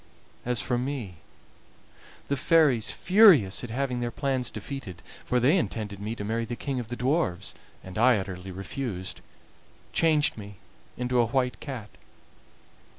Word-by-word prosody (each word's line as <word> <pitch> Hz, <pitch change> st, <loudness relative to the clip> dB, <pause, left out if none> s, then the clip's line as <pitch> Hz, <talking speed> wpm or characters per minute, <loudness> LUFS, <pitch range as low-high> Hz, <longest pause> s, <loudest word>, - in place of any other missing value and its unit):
As 125 Hz, -2 st, +1 dB
for 120 Hz, +3 st, 0 dB
me, 125 Hz, -, -4 dB, 1.1 s
the 140 Hz, -, 0 dB
fairies, 140 Hz, -6 st, +3 dB
furious 175 Hz, -, +5 dB
at 125 Hz, -, -5 dB
having 125 Hz, +1 st, -2 dB
their 120 Hz, 0 st, -1 dB
plans 130 Hz, -1 st, -1 dB
defeated, 105 Hz, -11 st, -7 dB, 0.2 s
for 125 Hz, -, +1 dB
they 135 Hz, +8 st, +4 dB
intended 105 Hz, -, -3 dB
me 105 Hz, +3 st, -4 dB
to 105 Hz, -, -6 dB
marry 115 Hz, +3 st, -1 dB
the 115 Hz, +1 st, -4 dB
king 135 Hz, +1 st, -3 dB
of 120 Hz, -, -5 dB
the 120 Hz, -, -4 dB
dwarfs, 130 Hz, -, -1 dB, 0.3 s
and 95 Hz, +2 st, -6 dB
I 120 Hz, 0 st, +5 dB
utterly 95 Hz, -1 st, -6 dB
refused, 95 Hz, 0 st, -5 dB, 0.7 s
changed 155 Hz, -7 st, +3 dB
me 105 Hz, 0 st, -9 dB, 0.4 s
into 125 Hz, 0 st, 0 dB
a 120 Hz, -, +4 dB
white 125 Hz, +1 st, 0 dB
cat. 125 Hz, -8 st, -7 dB
120 Hz, 150 wpm, -27 LUFS, 105-135 Hz, 1.1 s, furious